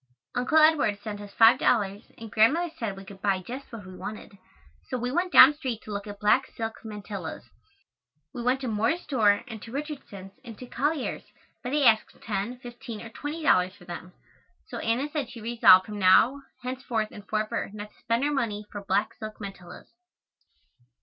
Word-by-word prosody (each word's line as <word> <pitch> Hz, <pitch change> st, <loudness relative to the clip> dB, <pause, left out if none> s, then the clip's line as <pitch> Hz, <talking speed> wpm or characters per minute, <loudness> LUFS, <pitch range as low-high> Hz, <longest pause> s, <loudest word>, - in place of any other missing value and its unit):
Uncle 250 Hz, +6 st, +1 dB
Edward 310 Hz, -10 st, +4 dB
sent 205 Hz, -2 st, -5 dB
us 205 Hz, -1 st, -10 dB
five 225 Hz, +4 st, +6 dB
dollars 205 Hz, -3 st, +1 dB, 0.2 s
and 225 Hz, -1 st, -9 dB
Grandmother 300 Hz, +11 st, +3 dB
said 210 Hz, -5 st, -3 dB
we 195 Hz, -, -10 dB
could 195 Hz, 0 st, -12 dB
buy 200 Hz, -2 st, +2 dB
just 255 Hz, +10 st, -8 dB
what 220 Hz, -5 st, -9 dB
we 185 Hz, 0 st, -10 dB
wanted, 210 Hz, +1 st, -8 dB, 0.5 s
so 255 Hz, -, -2 dB
we 245 Hz, +1 st, -2 dB
went 355 Hz, +5 st, 0 dB
down 285 Hz, -3 st, +9 dB
street 260 Hz, -7 st, -4 dB
to 215 Hz, -, -9 dB
look 200 Hz, +1 st, -4 dB
at 205 Hz, 0 st, -8 dB
black 250 Hz, +5 st, +3 dB
silk 225 Hz, -1 st, -4 dB
mantillas. 205 Hz, -6 st, -7 dB, 0.9 s
We 240 Hz, -, -5 dB
went 250 Hz, +2 st, +1 dB
to 260 Hz, -, -3 dB
Moore's 225 Hz, +10 st, 0 dB
store 210 Hz, -7 st, +2 dB
and 220 Hz, -3 st, -8 dB
to 225 Hz, -, -10 dB
Richardson's 270 Hz, -9 st, -7 dB
and 230 Hz, -4 st, -10 dB
to 250 Hz, -, -9 dB
Collier's, 290 Hz, +3 st, -2 dB, 0.4 s
but 245 Hz, -, -4 dB
they 290 Hz, +2 st, +1 dB
asked 220 Hz, -2 st, +3 dB
ten, 210 Hz, +3 st, -3 dB
fifteen 240 Hz, -2 st, -9 dB
or 230 Hz, -, -9 dB
twenty 295 Hz, +7 st, -6 dB
dollars 185 Hz, -10 st, +3 dB
for 175 Hz, -, -17 dB
them, 180 Hz, +1 st, -8 dB, 0.6 s
so -, -, -5 dB
Anna 240 Hz, +5 st, 0 dB
said 290 Hz, -5 st, -3 dB
she 245 Hz, -2 st, -10 dB
resolved 225 Hz, -5 st, +6 dB
from 210 Hz, -1 st, -7 dB
now, 220 Hz, +9 st, +5 dB, 0.2 s
henceforth 250 Hz, -4 st, -2 dB
and 205 Hz, -1 st, -12 dB
forever 215 Hz, +1 st, -2 dB
not 210 Hz, 0 st, -8 dB
to -, -, -27 dB
spend 230 Hz, +2 st, 0 dB
her 295 Hz, -, +1 dB
money 215 Hz, -6 st, -2 dB
for 205 Hz, -1 st, -7 dB
black 205 Hz, +4 st, 0 dB
silk 215 Hz, -1 st, -8 dB
mantillas. 195 Hz, -3 st, -9 dB
225 Hz, 190 wpm, -27 LUFS, 205-255 Hz, 0.9 s, down